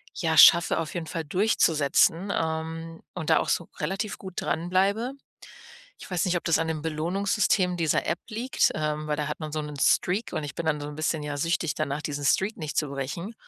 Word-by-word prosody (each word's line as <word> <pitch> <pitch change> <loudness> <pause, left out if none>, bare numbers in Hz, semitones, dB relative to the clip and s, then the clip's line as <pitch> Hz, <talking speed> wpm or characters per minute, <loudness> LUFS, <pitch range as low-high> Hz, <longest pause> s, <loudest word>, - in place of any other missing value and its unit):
ja, 160 -2 0
schaffe, 170 +1 +8
auf 160 -2 -4
jeden 170 -3 -4
Fall, 165 -2 -4
durchzusetzen, 170 0 +2
ähm, 160 +1 -3
und 170 -4 -4
da - - +5
auch - - -2
so 170 - -1
relativ 195 +7 -3
gut 190 -2 -9
dranbleibe. 195 +9 0 0.9
Ich - - -12
weiß 180 -2 0
nicht, 180 -1 +1
ob 175 - -3
das 165 - +3
an 165 - -1
dem 155 -2 -3
Belohnungssystem 180 +3 0
dieser 160 -3 +1
App 170 - 0
liegt, 240 +3 +1
ähm, 150 0 -2
weil 150 - 0
da 150 0 -2
hat 150 - -5
man 155 -1 -5
so 155 - -1
'nen 150 -1 -7
Streak 195 +10 +2
und 155 - -2
ich 140 -1 -6
bin 170 - -5
dann 150 -2 +1
so 145 - -5
'n 150 - -8
bisschen, 155 0 -1
ja, 145 -1 -4
süchtig 165 0 0
danach, 150 -1 -2
diesen 145 -2 -4
Streak 190 +9 +2
nicht 155 -4 -5
zu 150 - +1
brechen. 140 - -5
165 Hz, 215 wpm, -26 LUFS, 150-180 Hz, 0.9 s, schaffe